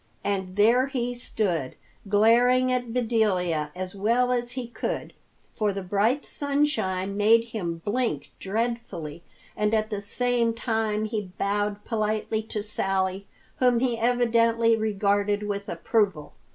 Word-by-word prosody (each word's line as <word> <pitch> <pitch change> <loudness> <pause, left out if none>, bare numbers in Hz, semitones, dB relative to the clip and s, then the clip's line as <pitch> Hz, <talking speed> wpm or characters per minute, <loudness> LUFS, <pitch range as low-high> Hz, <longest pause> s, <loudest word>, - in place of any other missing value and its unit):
And 190 -2 -2
there 235 +6 +4
he 245 -3 -2
stood, 185 - -2 0.3
glaring 245 +5 +4
at 245 -2 -1
Bedelia 195 -10 +1
as 185 0 -5
well 235 +5 +1
as 240 -1 -1
he 255 -2 -4
could, 235 - -4 0.4
for 210 -2 0
the 195 0 -5
bright 210 +9 +1
sunshine 280 -10 0
made 220 +3 +5
him 170 -7 -4
blink 220 - -1
dreadfully, 195 -7 -3 0.3
and 210 +1 +1
at 215 0 0
the 205 -1 -2
same 235 +2 0
time 220 -2 -1
he 210 -4 -4
bowed 205 +1 -1
politely 215 -1 -1
to 215 -1 -4
Sally, 195 -2 -1 0.3
whom 250 -2 +3
he 245 -1 +1
evidently 230 -1 +3
regarded 205 -1 +1
with 200 -1 -4
approval. 195 -10 0
215 Hz, 130 wpm, -26 LUFS, 200-240 Hz, 0.4 s, made